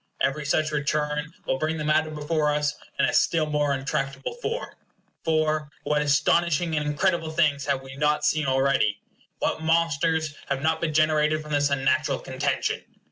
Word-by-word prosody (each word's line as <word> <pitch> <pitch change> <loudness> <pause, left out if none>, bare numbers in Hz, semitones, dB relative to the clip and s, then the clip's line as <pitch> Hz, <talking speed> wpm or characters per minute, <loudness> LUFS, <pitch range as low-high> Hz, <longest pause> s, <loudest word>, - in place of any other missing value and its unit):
Every 145 +2 0
such 155 +1 +1
return 150 +1 -1
will 130 - -1
bring 155 +2 -1
the 150 - -3
matter 155 +1 +2
before 150 0 0
us 150 0 0 0.2
in - - +3
a - - 0
still 160 -2 +3
more 150 -1 0
untractable 135 0 -2
form. 475 +1 -3 0.5
For, 155 -2 +1
what 150 0 +1
astonishing 160 +3 +2
and 150 -1 -1
incredible 165 +2 0
things 150 -4 +1
have 140 -2 -1
we 135 0 -10
not 150 +1 +1
seen 155 -2 +1
already! 130 -6 +2 0.4
What 160 - -1
monsters 160 -1 +1
have 140 0 -2
not 160 0 +1
been 155 -3 -1
generated 155 0 +2
from 150 - -10
this 145 -1 +2
unnatural 135 -1 +1
contention! - - -2
150 Hz, 165 wpm, -25 LUFS, 145-155 Hz, 0.5 s, in